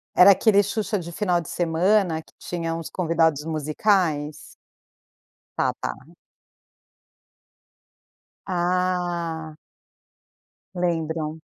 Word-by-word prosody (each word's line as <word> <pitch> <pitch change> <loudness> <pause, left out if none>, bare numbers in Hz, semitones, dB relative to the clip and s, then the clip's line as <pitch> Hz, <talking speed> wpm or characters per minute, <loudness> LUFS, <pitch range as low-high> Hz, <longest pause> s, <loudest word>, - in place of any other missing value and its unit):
Era 180 - +8
aquele 200 +1 +4
Xuxa 205 +1 -2
de 170 -1 -7
final 175 -1 0
de 165 - -10
semana 175 0 +1
que - - -24
tinha 165 -2 -3
uns 165 -1 -5
convidados 165 -4 +1
musicais? 155 -1 0 1.0
Tá, - - +1
tá. - - -3 2.5
Ah. 175 -3 -1 1.2
Lembram. 160 -3 -2
170 Hz, 85 wpm, -24 LUFS, 160-185 Hz, 2.5 s, Era